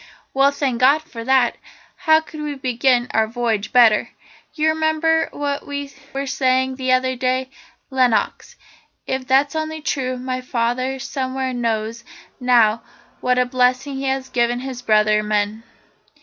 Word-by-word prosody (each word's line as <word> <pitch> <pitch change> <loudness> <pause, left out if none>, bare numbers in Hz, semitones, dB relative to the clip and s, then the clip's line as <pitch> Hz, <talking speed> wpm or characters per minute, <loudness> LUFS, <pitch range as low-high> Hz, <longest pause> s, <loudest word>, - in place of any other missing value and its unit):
"Well, 275 +1 +4
thank 275 -4 -2
God 285 +5 +5
for 235 -8 -9
that. 260 -2 +3 0.4
How 315 0 +3
could 310 -1 -10
we 295 -1 -4
begin 250 -1 +1
our 220 0 +2
voyage 225 -3 -2
better? 230 -4 +5 0.5
You 310 0 +2
remember 315 +1 +1
what 285 -1 -3
we 285 -1 -5 0.2
were 275 +1 -3
saying 260 0 +1
the 260 -1 -1
other 255 0 +2
day, 255 +1 -1 0.4
Lenox. 255 -4 0 0.5
If 265 -1 -3
that's 275 +2 +3
only 315 0 -3
true, 260 -4 -2
my 255 0 -4
father 255 +2 -1
somewhere 260 0 -3
knows 230 -1 -2 0.4
now 235 -3 +3 0.4
what 250 0 +1
a 250 - +3
blessing 255 +2 +1
he 270 - -4
has 265 0 -1
given 240 0 0
his 260 -2 -6
brother 215 -2 +3
men! 210 +1 -1
255 Hz, 150 wpm, -20 LUFS, 240-275 Hz, 0.5 s, God